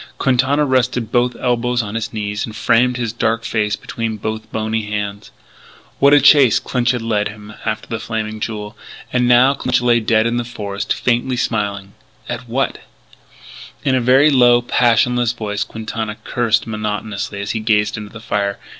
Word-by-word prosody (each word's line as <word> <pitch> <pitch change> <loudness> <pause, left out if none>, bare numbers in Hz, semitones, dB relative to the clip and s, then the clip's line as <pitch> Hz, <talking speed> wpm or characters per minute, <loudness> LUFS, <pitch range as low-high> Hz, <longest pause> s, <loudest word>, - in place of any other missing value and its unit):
Quintana 135 +3 +2
rested 125 -3 0
both 125 0 +1
elbows 125 0 0
on 105 -1 -6
his 115 -1 -3
knees 105 -1 -3
and 110 - -6
framed 125 +3 +2
his 115 -3 -3
dark 115 0 0
face 105 -2 0
between 115 0 -4
both 110 +1 -5
bony 110 0 -2
hands. 105 0 -4 0.7
What 140 - +5
a 145 - +7
chase 140 -4 +6
Clinch 125 -1 -1
had 125 -2 0
led 105 -2 0
him 105 0 -11
after 110 -1 -3
the 115 - -4
Flaming 110 -1 -4
Jewel. 105 0 -5 0.4
And 125 -1 +2
now 125 +3 +5
Clinch 125 -2 0
lay 120 -1 +3
dead 110 0 +2
in 115 +1 0
the 120 - -1
forest 105 -4 -5
faintly 125 +1 0
smiling. 100 -4 -2 0.3
At 120 0 -6
what? 135 +4 -1 1.0
In 135 - +1
a 130 - +2
very 135 +5 +5
low, 120 -2 +5
passionless 120 0 +2
voice, 105 -3 -3
Quintana 110 -1 -5
cursed 115 -2 0
monotonously 105 -2 -4
as 100 0 -3
he 110 - -2
gazed 105 -1 +1
into 105 -1 -7
the 115 - -10
fire. 100 -3 -1
115 Hz, 170 wpm, -18 LUFS, 105-125 Hz, 1.0 s, a